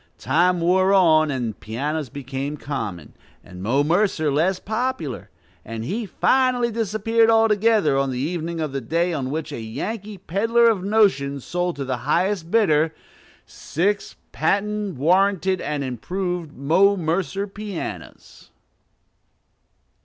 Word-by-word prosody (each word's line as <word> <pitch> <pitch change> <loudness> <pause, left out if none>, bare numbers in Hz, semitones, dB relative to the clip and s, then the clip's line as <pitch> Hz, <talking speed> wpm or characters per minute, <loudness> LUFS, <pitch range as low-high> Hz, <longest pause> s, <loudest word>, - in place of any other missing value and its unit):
Time 180 +1 +2
wore 185 +3 +3
on, 160 -5 +5
and 120 -6 -3
pianos 140 +6 -3
became 140 +2 -5
common, 110 - -5 0.3
and 90 0 -11
Mo 130 +8 +2
Mercer 165 -2 +1
less 175 +6 +1
popular; 220 - -3 0.3
and 115 0 -6
he 215 - -3
finally 250 +2 +2
disappeared 225 +1 +1
altogether, 220 -7 +3
on 135 0 0
the 130 - -3
evening 165 +4 -3
of 155 -3 -2
the 135 0 -3
day 170 +7 0
on 135 -4 -2
which 155 +2 -4
a 140 - -5
Yankee 205 - -5
peddler 225 +6 +2
of 195 -5 -3
notions 185 - +2
sold 175 0 -2
to 140 - -4
the 130 -1 -2
highest 170 - 0
bidder, 160 -7 +2 0.5
"six 200 +5 -2 0.2
patent, 210 -1 -1
warranted, 185 +4 +2
and 150 -2 -2
improved 175 - -3
Mo 185 +10 +3
Mercer 175 +2 -1
pianos." 205 -2 -8
170 Hz, 130 wpm, -22 LUFS, 140-200 Hz, 0.5 s, on